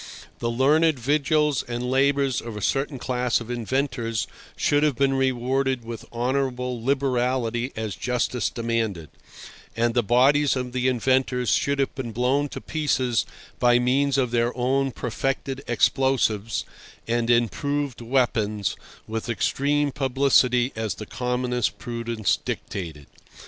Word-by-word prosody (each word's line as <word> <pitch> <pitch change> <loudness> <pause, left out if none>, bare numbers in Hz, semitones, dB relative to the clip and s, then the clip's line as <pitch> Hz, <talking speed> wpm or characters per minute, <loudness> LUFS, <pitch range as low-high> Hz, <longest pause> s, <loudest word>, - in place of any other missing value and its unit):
The 115 - -1
learned 145 +6 +3
vigils 150 +2 +2
and 120 +1 -4
labours 135 -1 +2
of 115 -2 -7
a - - -6
certain 135 0 0
class 125 -1 0
of 120 0 -7
inventors 120 -1 -1 0.3
should 145 0 +2
have 150 -3 +2
been 135 +1 +2
rewarded 130 -1 0
with 115 -1 -7
honourable 125 -1 -1
liberality 125 -2 0
as 110 -2 -3
justice 125 0 -1
demanded; 115 -8 -2 0.7
and 115 0 +2
the 120 - +3
bodies 135 +6 +4
of 125 -1 -3
the 125 0 0
inventors 125 -1 +1
should 140 +5 +1
have 135 -1 0
been 120 -4 -5
blown 130 +5 +1
to - - -6
pieces 130 -6 0 0.3
by 120 0 +5
means 135 +3 +2
of 125 -3 +1
their 120 +1 0
own 135 +2 +1
perfected 135 +3 -3
explosives 120 -3 +1 0.4
and 120 0 0
improved 135 +3 0
weapons 115 -5 0 0.3
with 110 +2 -4
extreme 145 +5 +1
publicity 130 -2 +2
as 110 -4 -2
the 110 - -7
commonest 125 0 -1
prudence 115 -3 -1
dictated. 80 -7 -5
125 Hz, 130 wpm, -24 LUFS, 115-135 Hz, 0.7 s, by